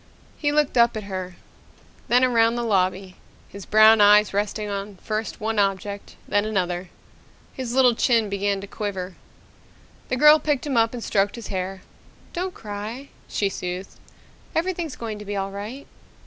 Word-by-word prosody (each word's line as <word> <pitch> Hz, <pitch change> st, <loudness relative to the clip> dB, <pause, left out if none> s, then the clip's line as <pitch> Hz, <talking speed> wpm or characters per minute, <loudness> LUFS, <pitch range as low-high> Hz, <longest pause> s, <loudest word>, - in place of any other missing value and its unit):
He 290 Hz, -1 st, 0 dB
looked 295 Hz, -4 st, +2 dB
up 235 Hz, -1 st, +4 dB
at 215 Hz, -, -5 dB
her, 185 Hz, -2 st, -6 dB, 0.7 s
then 245 Hz, +2 st, +4 dB
around 230 Hz, -2 st, +3 dB
the 240 Hz, -, -2 dB
lobby, 190 Hz, -3 st, 0 dB, 0.3 s
his 200 Hz, -1 st, -10 dB
brown 215 Hz, 0 st, +7 dB
eyes 210 Hz, 0 st, +6 dB
resting 210 Hz, +1 st, -1 dB
on 200 Hz, 0 st, -5 dB
first 215 Hz, +3 st, -4 dB
one 220 Hz, 0 st, -1 dB
object, 200 Hz, 0 st, -2 dB
then 205 Hz, 0 st, +2 dB
another. 180 Hz, -4 st, -2 dB, 0.6 s
His 255 Hz, -3 st, -4 dB
little 255 Hz, -2 st, +5 dB
chin 230 Hz, -2 st, +2 dB
began 200 Hz, 0 st, -1 dB
to -, -, -7 dB
quiver. 195 Hz, -3 st, -5 dB, 1.0 s
The 255 Hz, -, 0 dB
girl 300 Hz, +3 st, +7 dB
picked 295 Hz, -3 st, -1 dB
him 280 Hz, -3 st, -2 dB
up 230 Hz, +1 st, +2 dB
and 235 Hz, -, -6 dB
stroked 200 Hz, 0 st, +1 dB
his 235 Hz, -3 st, -8 dB
hair. 190 Hz, 0 st, -4 dB, 0.5 s
"Don't 365 Hz, +1 st, -3 dB
cry," 215 Hz, +6 st, -7 dB, 0.2 s
she 200 Hz, -, 0 dB
soothed. 185 Hz, 0 st, -5 dB, 0.6 s
"Everything's 335 Hz, -3 st, -1 dB
going 220 Hz, -3 st, -6 dB
to 210 Hz, -, -9 dB
be 205 Hz, 0 st, -4 dB
all 195 Hz, 0 st, -2 dB
right." 215 Hz, +8 st, -7 dB
210 Hz, 160 wpm, -23 LUFS, 195-240 Hz, 1.0 s, brown